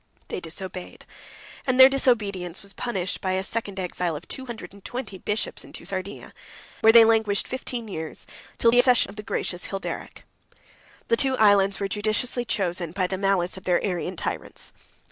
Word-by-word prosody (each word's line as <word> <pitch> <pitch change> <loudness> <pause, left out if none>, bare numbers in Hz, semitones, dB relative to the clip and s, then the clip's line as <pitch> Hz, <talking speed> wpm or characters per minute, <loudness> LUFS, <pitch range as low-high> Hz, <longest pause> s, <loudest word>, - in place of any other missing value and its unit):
They - - -3
disobeyed, 180 +2 -6 0.6
and 255 0 +1
their 260 - +12
disobedience 205 -10 0
was 200 0 -5
punished 190 -7 -3
by 185 -1 0
a 190 0 0
second 200 -2 -1
exile 180 -2 -2
of 165 +3 -8
two 265 -1 -5
hundred 235 -4 -8
and 200 -1 -16
twenty 235 -6 -6
bishops 210 +4 -3
into - - -11
Sardinia; 195 +1 -5 0.5
where 220 - +7
they 230 0 +9
languished 220 -3 +2
fifteen 245 -2 -4
years, 160 -5 -5 0.3
till 230 - +4
the 245 - +5
accession 245 -5 +5
of - - -14
the 210 - -6
gracious 180 -4 -2
Hilderic. 195 -1 -6 0.3
96 - - -31 0.5
The 230 - +4
two 265 +1 +3
islands 200 -2 +4
were 200 - -1
judiciously 215 +5 0
chosen 175 -6 -1
by 185 -1 0
the 190 - -2
malice 195 -2 +1
of 190 - -11
their 180 -1 +3
Arian 180 -1 -2
tyrants. - - -5
200 Hz, 180 wpm, -25 LUFS, 185-230 Hz, 0.6 s, their